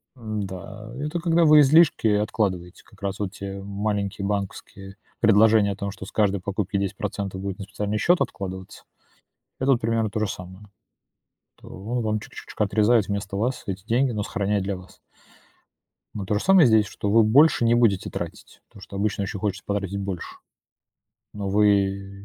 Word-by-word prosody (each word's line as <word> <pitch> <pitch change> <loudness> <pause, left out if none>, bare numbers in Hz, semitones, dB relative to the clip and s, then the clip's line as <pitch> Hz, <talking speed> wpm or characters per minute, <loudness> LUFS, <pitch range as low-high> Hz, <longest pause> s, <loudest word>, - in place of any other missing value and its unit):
М, 110 -4 -4
да, 105 +4 -9
это 150 +4 -3
когда 170 0 +3
вы 155 -1 +7
излишки 155 -3 +5
откладываете. 105 -4 -1
Как - - -22
раз 100 -1 -3
вот 100 -2 -3
те 100 - -8
м 100 - -9
маленькие 100 -1 -2
банковские 100 -1 -5 0.2
предложения 110 -1 +5
о - - -4
том, 100 0 -4
что 95 - -9
с - - -11
каждой 100 -3 +1
покупки 100 +1 -2
10 100 0 -3
будет 95 0 -5
на 100 - -6
специальный 105 +2 -3
счёт 175 - +3
откладываться. 95 -1 -5 0.8
Это 135 +1 +2
вот 120 - +2
примерно 115 -1 0
то 110 - -3
же 110 - +1
самое. 95 +2 -9 0.9
То - - -15
он 115 +6 -4
вам 110 -1 0
чуть-чуточку 105 - -5
отрезает 105 +1 +3
вместо 100 -1 -3
вас 125 +5 -1
эти 95 0 -5
деньги, 125 +4 +1
но 105 -2 -2
сохраняет 100 -2 -1
для 100 0 -2
вас. 90 0 -15 1.2
Но 100 -2 -5
то 105 +2 -1
же - - -3
самое 190 -4 +6
и - - +6
здесь, 110 -3 +4
что 105 - -4
вы 115 +2 +5
больше 135 +5 +5
не 115 - +4
будете 115 -6 +2
тратить, - - -8
потому 100 - -16
что 100 - -10
обычно 100 0 -1
еще 100 +1 -5
хочется 100 -1 -3
потратить 100 -1 -2
больше, 100 -3 -5 1.0
но 100 -1 -4
вы, 100 -1 +1
105 Hz, 180 wpm, -24 LUFS, 100-110 Hz, 1.2 s, вы